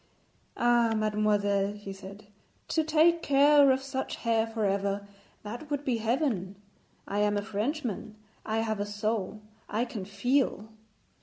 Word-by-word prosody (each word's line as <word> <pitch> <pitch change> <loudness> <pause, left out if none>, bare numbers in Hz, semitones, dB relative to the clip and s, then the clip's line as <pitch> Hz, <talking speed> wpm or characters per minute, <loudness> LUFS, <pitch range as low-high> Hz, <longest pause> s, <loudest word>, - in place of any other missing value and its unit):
'Ah, 240 -1 +3
mademoiselle,' 205 -2 +1
he 205 -1 -8
said, 195 +2 -11 0.4
'to 320 - +1
take 325 +2 +4
care 285 0 +5
of 265 0 +2
such 265 -1 -3
hair 230 -1 +1
for 225 -1 -2
ever 200 0 -1 0.4
that 240 +8 -7
would 290 -1 -2
be 250 -3 +1
heaven. 225 - -1 0.5
I 205 - -2
am 210 0 +2
a 205 - -2
Frenchman; 220 - -3 0.3
I 220 +1 -1
have 220 -2 -2
a 205 - -1
soul; 210 0 -2 0.3
I 225 +3 0
can 210 -5 -6
feel.' 220 +1 0
220 Hz, 145 wpm, -29 LUFS, 205-260 Hz, 0.5 s, care